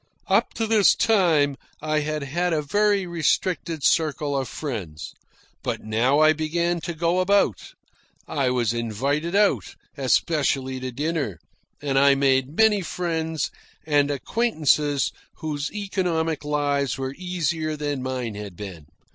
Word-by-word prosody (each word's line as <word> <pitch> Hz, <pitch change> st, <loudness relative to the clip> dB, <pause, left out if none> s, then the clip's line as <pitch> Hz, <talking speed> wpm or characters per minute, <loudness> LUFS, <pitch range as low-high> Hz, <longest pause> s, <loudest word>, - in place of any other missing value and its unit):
Up -, -, +1 dB
to 225 Hz, -, 0 dB
this 215 Hz, -2 st, +5 dB
time 165 Hz, -, +3 dB, 0.2 s
I 155 Hz, 0 st, 0 dB
had 150 Hz, 0 st, -2 dB
had 175 Hz, +5 st, -1 dB
a 155 Hz, -1 st, 0 dB
very 205 Hz, +5 st, +2 dB
restricted 170 Hz, -1 st, -1 dB
circle 150 Hz, -2 st, +1 dB
of 135 Hz, -2 st, -1 dB
friends. 100 Hz, -, -6 dB, 0.5 s
But -, -, -3 dB
now 115 Hz, +6 st, +2 dB
I 155 Hz, 0 st, +6 dB
began 170 Hz, +2 st, -1 dB
to 170 Hz, 0 st, -4 dB
go 170 Hz, +3 st, +1 dB
about. 185 Hz, -, +1 dB, 0.5 s
I 135 Hz, -3 st, 0 dB
was 120 Hz, -3 st, +1 dB
invited 135 Hz, -, -1 dB
out, 205 Hz, 0 st, +2 dB, 0.2 s
especially 135 Hz, -1 st, +1 dB
to 130 Hz, 0 st, -4 dB
dinner, 145 Hz, -, -2 dB, 0.5 s
and 135 Hz, -2 st, +2 dB
I 140 Hz, 0 st, +6 dB
made 135 Hz, +1 st, +1 dB
many 220 Hz, -2 st, +5 dB
friends 160 Hz, -4 st, -2 dB, 0.3 s
and 145 Hz, -2 st, +3 dB
acquaintances 150 Hz, -, +1 dB, 0.2 s
whose 150 Hz, -1 st, -4 dB
economic 175 Hz, -7 st, -1 dB
lives 145 Hz, -2 st, 0 dB
were 135 Hz, 0 st, -3 dB
easier 170 Hz, -4 st, -2 dB
than 145 Hz, -2 st, -2 dB
mine 125 Hz, -3 st, -3 dB
had 100 Hz, -3 st, -7 dB
been. 90 Hz, -6 st, -9 dB
150 Hz, 135 wpm, -24 LUFS, 135-170 Hz, 0.5 s, I